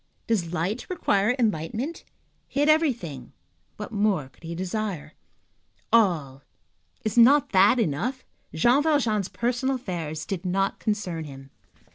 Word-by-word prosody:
Does 185 -8 0
light 180 +8 -2
require 220 - +1
enlightenment? 225 - -2 0.4
He 280 - -4
had 295 - +3
everything; 235 - 0 0.4
what 210 - -7
more 200 -10 0
could - - -28
he 165 +1 -5
desire? 185 -4 -4 0.8
All,—is 175 - -1
not 275 +4 +6
that 200 +6 +5
enough? 230 - -1 0.3
Jean 240 - +3
Valjean's 240 - +1
personal 245 +3 -1
affairs 165 -10 -5
did 190 -2 -4
not 195 +1 0
concern 180 -7 -2
him. 135 -1 -11
205 Hz, 120 wpm, -25 LUFS, 165-240 Hz, 0.8 s, not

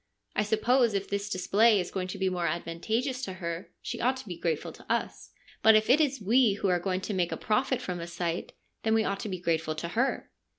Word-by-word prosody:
I - - +3
suppose 225 +2 +2
if 200 0 -1
this 200 +1 -2
display 205 +3 +4
is 180 - -3
going 185 -1 -2
to 185 - -6
be 190 - 0
more 180 -2 0
advantageous 220 - -2
to 190 -7 -4
her, 170 -1 -5
she - - -4
ought 255 +2 +2
to 260 - -10
be 180 - -5
grateful 165 -1 -2
to - - -9
us. - - -2 0.3
But 220 0 +7
if 215 +2 +4
it 295 +5 +6
is 275 -3 +1
we 225 +2 +4
who 200 -1 -1
are 180 -1 +3
going 185 +1 -1
to 205 - -3
make 180 -3 0
a - - -2
profit 255 +4 +1
from 180 -1 -3
the 170 - -5
sight, 170 0 -3 0.3
then 220 0 +2
we 220 - +3
ought 200 -2 -2
to 215 - -4
be 185 - -3
grateful 160 -2 0
to 170 +2 -4
her.' 245 +9 -1
200 Hz, 245 wpm, -29 LUFS, 175-225 Hz, 0.3 s, But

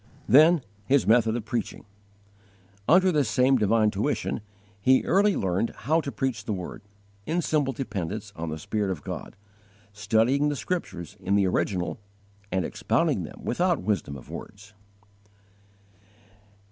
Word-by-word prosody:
6. 155 +1 +6 0.2
His 140 0 +3
method 115 0 +4
of 120 -3 -4
preaching. 115 -1 -4 1.0
Under 185 +3 +5
this 145 -8 +1
same 125 +5 +3
divine 110 0 +3
tuition 110 +3 -1 0.4
he 130 +5 +4
early 200 +2 +3
learned 95 +4 -1
how 160 +7 +2
to 140 - -5
preach 130 -5 -2
the 110 - -1
Word, 90 +2 -6 0.5
in 170 +2 0
simple 145 -4 +1
dependence 105 -4 -5
on 80 0 -4
the 80 - -4
Spirit 105 +5 -2
of 90 -6 -4
God, - - -6 0.6
studying 110 +8 +2
the 145 - -1
Scriptures 115 - -4
in 100 +2 0
the 100 -1 +3
original 90 +1 -1 0.5
and 95 -2 0
expounding - - 0
them - - -11
without 175 +5 0
wisdom 95 -9 -1
of 65 - -13
words. 100 +1 -10
110 Hz, 140 wpm, -26 LUFS, 100-140 Hz, 1.0 s, 6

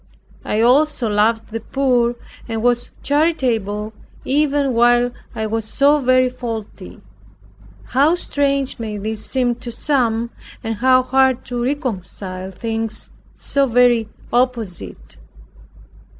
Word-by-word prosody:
I 215 - 0
also 260 +1 +3
loved 220 +2 +1
the 225 0 -4
poor, 245 -1 +1 0.3
and 225 0 -3
was 245 0 +1
charitable, 235 -9 0 0.3
even 285 -1 +1
while 240 +1 +4 0.2
I 220 - -2
was 225 +1 -2
so 285 +6 +3
very 255 -1 +3
faulty. 225 - -7 0.8
How 285 - +3
strange 280 -6 -1
may 215 -2 -4
this 215 +1 -4
seem 250 -2 +1
to 245 -1 -7
some, 235 -4 0 0.3
and 225 -1 -3
how 255 +2 +4
hard 260 -1 +2
to 245 -1 -3
reconcile 195 -8 -4
things 225 +2 -3 0.3
so 280 -1 +1
very 240 -2 +3 0.2
opposite. 240 -7 -2
240 Hz, 115 wpm, -19 LUFS, 225-265 Hz, 0.8 s, while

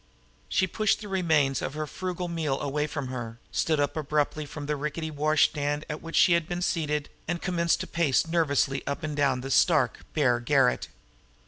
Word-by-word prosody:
She 190 - +2
pushed 215 +3 +1
the 210 - -7
remains 160 -8 +2
of 140 - -4
her 155 0 -2
frugal 180 +3 -4
meal 160 -5 -1
away 150 +1 -1
from 145 -3 -4
her, 120 -3 -5
stood 155 -2 +1
up 145 -1 0
abruptly 150 0 -1
from 145 0 -7
the 150 +1 -1
rickety 150 +2 -3
washstand 150 0 +1
at 155 0 -5
which 165 0 -6
she 175 - +6
had 170 -2 +1
been 175 0 -2
seated, 150 -4 -1 0.2
and 170 +1 -1
commenced 170 -2 +1
to - - -3
pace 165 -6 +2
nervously 145 -5 +1
up 140 +2 -3
and 150 -1 -3
down 135 -3 +1
the 135 +1 -5
stark, - - +3 0.2
bare 125 -5 +3
garret. 135 0 +2
150 Hz, 190 wpm, -27 LUFS, 140-165 Hz, 0.2 s, she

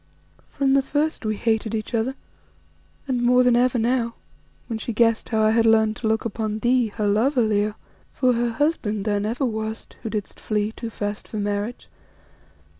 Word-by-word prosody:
From 270 -1 +1
the 275 - +5
first 290 -2 -1
we 215 - 0
hated 220 -1 0
each 215 +2 -4
other, 235 +4 0 0.9
and 250 -2 0
more 250 +1 +5
than 250 -1 +4
ever 250 +1 +3
now, 235 0 0 0.5
when 225 -2 -4
she 235 - -4
guessed 230 0 +2
how 220 -2 +2
I 215 - +4
had 225 0 +3
learned 220 -1 +4
to 225 - -2
look 220 +1 0
upon 215 -1 -2
thee, 240 +1 +2
her 210 -2 0
lover, 240 +5 +3
Leo; 210 -1 +1 0.4
for 255 -1 +2
her 240 0 0
husband 225 -6 -1
thou 205 -2 +1
never 225 +6 -1
wast, 220 -1 -4
who 225 - -4
didst 210 -2 -5
flee 210 0 -1
too 230 +1 -6
fast 205 -1 -4
for 215 - -6
marriage. 205 +3 -3
225 Hz, 185 wpm, -23 LUFS, 215-245 Hz, 0.9 s, the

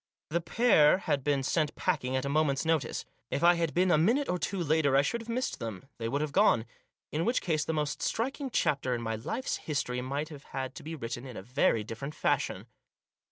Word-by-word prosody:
The 170 +2 +1
pair 165 -4 +5
had 145 -7 -1
been 140 -1 +1
sent 150 +2 0
packing 130 +1 0
at 130 +1 0
a - - -1
moment's 140 0 +1
notice. 160 -7 0 0.2
If 150 - -2
I 175 +1 +8
had 170 -2 0
been 180 +2 +2
a 155 - +5
minute 240 - +2
or 180 - 0
two 195 +4 -2
later 150 -3 +2
I 140 - +5
should 235 +11 -1
have 230 - -11
missed 250 +3 -2
them; 115 -1 -6
they 115 0 -2
would 140 +4 0
have 150 -1 -2
gone. 185 - +4 0.5
In 155 +2 0
which 240 +5 +2
case 155 -4 0
the 160 - -1
most 150 -2 -2
striking 270 +4 -1
chapter 135 - +1
in 120 - -4
my 110 0 -1
life's 190 - -3
history 125 -5 -2
might 140 +4 -3
have 145 -3 -11
had 130 -1 -4
to - - -9
be 160 +1 -6
written 120 -1 -5
in 125 - -8
a - - -7
very 115 -1 +2
different 120 +7 -6
fashion. - - 0
150 Hz, 225 wpm, -30 LUFS, 130-170 Hz, 0.5 s, I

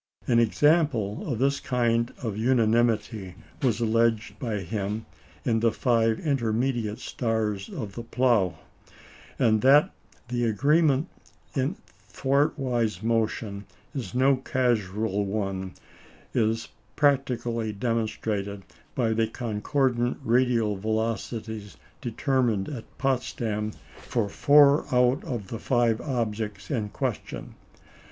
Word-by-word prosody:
An 120 -1 +3
example 135 -2 +2
of 120 - -1
this 140 +3 +1
kind 115 -1 +1
of 110 -4 -2
unanimity 110 -4 +1 0.3
was 120 -5 +1
alleged 115 -1 +1
by 115 -7 -2
him 105 +4 -3 0.4
in 115 -1 +2
the 115 0 +3
five 115 -2 +2
intermediate 120 -5 0
stars 110 -5 -2
of 105 -6 -6
the 120 - -5
Plough; 115 -7 +1 0.8
and 110 -2 +3
that 145 +7 +6 0.4
the 120 -1 0
agreement 140 +6 +3 0.5
in 135 +6 0 0.4
thwartwise 130 - 0
motion 110 -3 -1 0.3
is 130 -3 -5
no 135 +1 +4
casual 110 -6 0
one 95 -2 -3 0.6
is 115 0 0 0.3
practically 120 -6 +1
demonstrated 105 -2 -2 0.3
by 115 -3 +1
the 110 0 +1
concordant 120 +2 0
radial 115 -3 +2
velocities 110 0 -3 0.2
determined 120 -4 0
at 130 -7 -8
Potsdam 120 -5 -1 0.3
for 115 -4 -1
four 145 +4 +5
out 125 +1 +3
of 110 -7 -5
the 115 - -5
five 120 -3 +2
objects 110 -4 -3
in 110 -6 -1
question. - - -4
115 Hz, 105 wpm, -26 LUFS, 110-130 Hz, 0.8 s, that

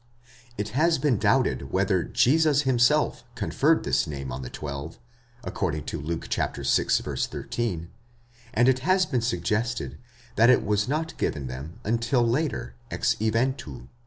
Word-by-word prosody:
It 105 +1 -2
has 160 +8 +2
been 135 -6 +1
doubted 70 -1 +1
whether 95 -2 +2
Jesus 150 +2 +3
himself 130 +3 +2
conferred - - +2
this - - +1
name 70 -3 -5
on 65 +2 -5
the 65 - -6
twelve, 75 +2 -6 0.5
according 75 - -2
to - - -5
Luke 80 +3 -4
vi. - - +1
13, 90 -8 -1 0.6
and 120 +2 +3
it 130 -1 +4
has 185 +6 +3
been 125 -7 -1
suggested 115 +2 -1 0.4
that 115 +2 +6
it 130 - +4
was 105 0 +1
not 160 +4 -2
given 70 -3 -1
them 65 +6 -7
until 115 +2 +1
later, 120 - -1 0.2
ex - - +1
eventu. 110 - -1
115 Hz, 140 wpm, -26 LUFS, 80-130 Hz, 0.6 s, that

